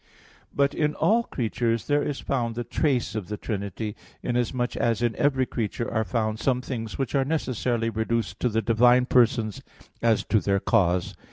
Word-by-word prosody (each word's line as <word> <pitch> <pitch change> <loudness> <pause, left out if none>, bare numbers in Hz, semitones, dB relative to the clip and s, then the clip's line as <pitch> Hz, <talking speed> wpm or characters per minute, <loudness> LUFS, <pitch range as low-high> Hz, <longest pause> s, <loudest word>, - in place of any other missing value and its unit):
But 140 0 +1
in 150 -1 0
all 225 +3 +3
creatures 115 -1 -1
there 145 0 +2
is 145 -1 -2
found 120 -4 -2
the 120 - -2
trace 130 -4 0
of 105 -5 -4
the 105 - -4
Trinity, 105 0 -4 0.3
inasmuch 120 +1 -1
as 115 0 0
in 120 -1 +1
every 135 -2 +2
creature 115 -1 -3
are 110 0 +1
found 110 +1 -1
some 125 0 +1
things 115 -4 -5
which 135 - -2
are 135 -2 +3
necessarily 125 -6 -1
reduced 110 0 -2
to 125 - +1
the 115 0 0
divine 120 +2 +4
Persons 120 -4 +2 0.4
as 115 -2 +3
to 110 - +2
their 100 -1 +1
cause. 90 -2 +1
115 Hz, 175 wpm, -25 LUFS, 110-130 Hz, 0.4 s, divine